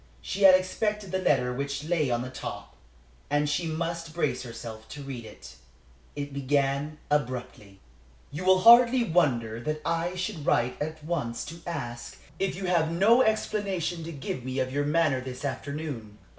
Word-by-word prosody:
She 195 - -5
had 190 -1 +9
expected 200 +1 -1
the 190 - 0
letter 130 -8 +2
which 140 +2 -3
lay 155 -3 +1
on 120 0 0
the 130 - -7
top, 100 -5 -7 0.5
and 145 +1 +2
she 145 +3 0
must 165 0 -3
brace 150 -7 0
herself 110 -2 -8
to 145 -1 -8
read 130 -4 -6
it. - - -12 0.6
It 145 -1 -5
began 140 +2 0
abruptly: 125 -8 -2 0.5
"You 150 +5 -5
will 185 0 +5
hardly 235 +2 +8
wonder 120 - +1
that 155 +5 -3
I 170 +2 -1
should 180 -3 -3
write 125 -1 +1
at 155 +1 -4
once 145 -8 -2
to 165 +3 -9
ask 120 -8 -5 0.2
if 195 -1 0
you 190 +1 -5
have 170 -3 +2
no 205 +9 +5
explanation 195 -7 0
to 165 - -5
give 135 -4 -5
me 130 +1 -4
of 130 0 -1
your 145 +1 0
manner 150 -3 +2
of 130 - -9
this 130 +2 -6
afternoon. 140 -6 -5
150 Hz, 170 wpm, -27 LUFS, 130-175 Hz, 0.6 s, had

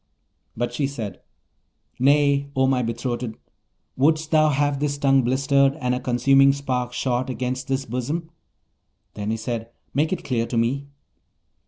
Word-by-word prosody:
But 120 +1 -2
she 140 - 0
said, 110 -9 -6 0.8
'Nay, 140 +1 +3
O 130 0 +3
my 130 -1 +2
betrothed! 120 0 -3 0.6
wouldst 155 +3 +2
thou 155 -1 +5
have 145 -1 +1
this 145 -1 -1
tongue 135 -1 +4
blistered, 135 +2 +2
and 125 -5 -1
a 125 - -1
consuming 135 +2 +4
spark 130 -3 -2
shot 125 0 -1
against 130 +1 -3
this 135 0 -1
bosom?' 145 +8 -3 0.8
Then 105 0 -4
he: 110 - 0 0.6
'Make 155 +3 +1
it 185 - -2
clear 115 -3 -1
to 120 - -2
me.' 135 +5 0
135 Hz, 145 wpm, -23 LUFS, 125-140 Hz, 0.8 s, thou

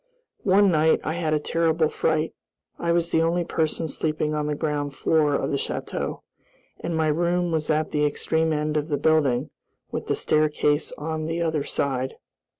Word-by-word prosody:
One 195 0 +5
night 160 0 +3
I 160 - -1
had 160 -2 0
a - - +1
terrible 160 +1 +1
fright. 155 +1 0 0.5
I 170 - 0
was 170 0 +1
the 160 - +3
only 170 +2 +1
person 160 0 -1
sleeping 155 -1 -1
on 150 -1 -1
the 150 - -1
ground 145 -2 -2
floor 150 -1 +2
of - - -1
the 140 - +1
château, - - -3 0.6
and 165 - -3
my 160 - +2
room 175 +3 +1
was 155 -2 -1
at 155 0 +1
the 150 -1 +1
extreme 160 +2 +1
end 150 0 0
of 150 0 -1
the 145 -3 0
building, 145 -4 +2 0.4
with - - -4
the - - +1
staircase 150 -1 +1
on 155 +1 -3
the 165 +1 -1
other 160 -3 0
side. 130 -2 -2
155 Hz, 180 wpm, -24 LUFS, 150-165 Hz, 0.6 s, One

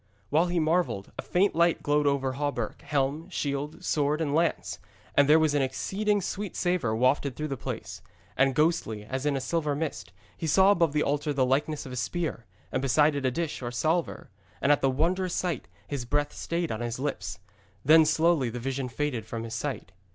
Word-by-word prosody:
While 160 +4 +4
he 175 0 0
marvelled, 160 - 0
a - - +1
faint 190 +3 +2
light 170 +1 +2
glowed 150 0 +2
over 135 -2 +1
hauberk, 140 -5 -3
helm, 145 +4 -1
shield, 145 -3 -3
sword 150 0 +1
and 150 -3 -1
lance, 165 +1 0 0.3
and 145 0 +4
there 155 - +8
was 155 -2 +3
an 145 - +2
exceeding 200 +10 0
sweet 200 +2 -4
savour 175 -12 0
wafted 130 +2 +2
through 155 0 -4
the 135 - -2
place. 125 - -6 0.3
And 135 0 +3
ghostily, 150 -10 +1
as 130 +3 -2
in 145 - +1
a - - 0
silver 150 +1 -1
mist, 130 - -4 0.2
he 165 - -4
saw 190 +6 +6
above 170 -6 +2
the 150 - +2
altar 145 +1 0
the 135 -2 +2
likeness 145 +4 0
of 130 - -8
a - - -5
spear, 150 - -3 0.2
and 130 - 0
beside 145 +3 +4
it 140 -2 -1
a - - +3
dish 160 +3 -3
or 120 - -3
salver. 155 - -1 0.3
And 140 - +3
at 145 - +3
the 135 - +3
wondrous 175 +7 0
sight 175 -8 -2 0.2
his 140 -4 -3
breath 145 +4 -1
stayed 170 0 -2
on 110 - -3
his 120 0 -3
lips. 140 +2 -3 0.5
Then 160 +3 +8
slowly 160 -4 +3
the 120 +2 -5
vision 135 +1 -3
faded 125 -4 -2
from 115 +1 -4
his 115 -1 -6
sight. 135 +4 -4
145 Hz, 205 wpm, -28 LUFS, 130-165 Hz, 0.5 s, there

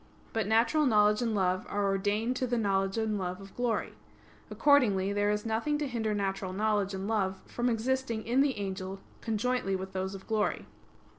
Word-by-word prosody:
But 225 -3 0
natural 235 +7 +3
knowledge 210 -1 +4
and 230 -3 0
love 185 -1 +1
are 205 0 0
ordained 205 +5 0
to 255 - -1
the 240 0 0
knowledge 195 -2 +1
and 220 -2 0
love 180 0 -3
of 195 0 -12
glory. 240 -3 -1 0.6
Accordingly 210 -5 +3
there 205 0 +1
is 210 +1 -1
nothing 230 +7 0
to 295 -1 -2
hinder 220 -4 -1
natural 195 -2 -2
knowledge 205 -1 0
and 190 +1 -4
love 195 -4 0
from 240 +1 -1
existing 235 -1 -1
in 245 +4 +3
the 280 -4 +1
angel 195 -1 -4 0.2
conjointly 225 -2 0
with 190 0 -5
those 190 +1 -3
of 190 - -10
glory. 220 -2 0
210 Hz, 180 wpm, -30 LUFS, 195-230 Hz, 0.6 s, knowledge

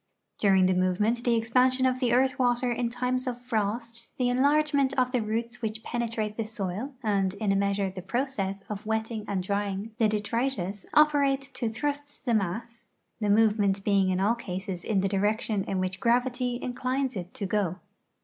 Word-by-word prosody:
During 190 -2 +4
the 185 - +3
movement 185 +6 +1
the 240 -1 +3
expansion 255 +3 +3
of 255 0 +1
the 250 -3 +1
earth 260 +3 +3
yvater 245 -1 +2
in 240 -1 -1
times 250 +2 -1
of 245 -1 -3
frost, 230 0 -3
the 250 -1 +2
enlarge 290 +4 +3
ment 275 -1 +2
of 255 -1 +2
the 250 -2 +1
roots 225 +2 -3
yvhich 220 -1 -4
penetrate 225 -3 -2
the 225 - 0
soil, 215 +5 -4
and 200 -3 +1
in 200 -1 0
a - - +2
measure 200 -1 +1
the 185 0 -7
process 200 -2 -2
of 210 -1 -5
yvetting 220 0 -2
and 190 -2 -1
dr^'ing 200 +2 -2
the 225 - +5
detritus 210 -2 -2
operate 280 -2 +3
to 235 - -2
thrust 290 +5 -4
the 240 - +1
mass, 225 +4 -2 0.3
the 210 -2 0
movement 205 -2 +3
being 195 -2 +3
in 185 0 +1
all 205 +4 +3
cases 190 -5 -5
in 200 -3 +1
the 195 - +1
direction 205 +1 0
in 195 - -2
yvhich 185 0 -2
gravit}' 245 +1 +1
inclines 255 +1 -2
it 180 -1 -5
to 200 - -3
go. 190 -3 0
225 Hz, 185 wpm, -27 LUFS, 200-250 Hz, 0.3 s, the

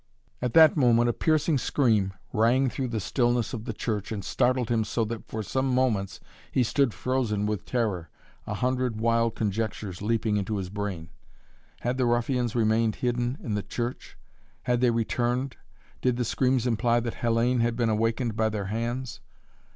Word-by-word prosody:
At 125 -1 -2
that 160 -2 +8
moment 120 -4 +4
a - - +1
piercing 155 0 +2
scream 110 -9 +1 0.2
rang 120 +4 +3
through 135 -2 -2
the 115 -2 -2
stillness 120 +4 0
of 115 -2 -5
the - - -2
church 105 -1 -3
and 100 -3 -4
startled 125 -2 +1
him 115 -2 +2
so 110 +2 -1
that 115 0 -6
for 110 0 -4
some 130 +6 -1
moments 120 -7 0 0.3
he 130 - +2
stood 135 +2 +2
frozen 105 0 -1
with 105 -2 -3
terror, 105 - -1 0.4
a - - -2
hundred 125 -3 -1
wild 115 0 +2
conjectures 105 -3 -3
leaping 110 0 +1
into 105 +1 -2
his 95 -2 -4
brain. 100 -6 -4 0.7
Had 125 +2 -1
the 125 - +3
ruffians 120 0 0
remained 110 -1 +2
hidden 120 +1 -1
in 110 - -3
the 105 - 0
church? 120 +4 -5 0.5
Had 125 0 +1
they 125 - +4
returned? 120 +3 -1 0.4
Did 125 -1 +1
the 125 - 0
screams 130 +1 +1
imply 120 0 +2
that 115 -1 -3
Hellayne 120 +2 +1
had 115 0 +1
been 115 -1 +1
awakened 115 +1 0
by 110 0 +2
their 105 -2 -3
hands? 120 +3 -3
115 Hz, 175 wpm, -27 LUFS, 110-125 Hz, 0.7 s, that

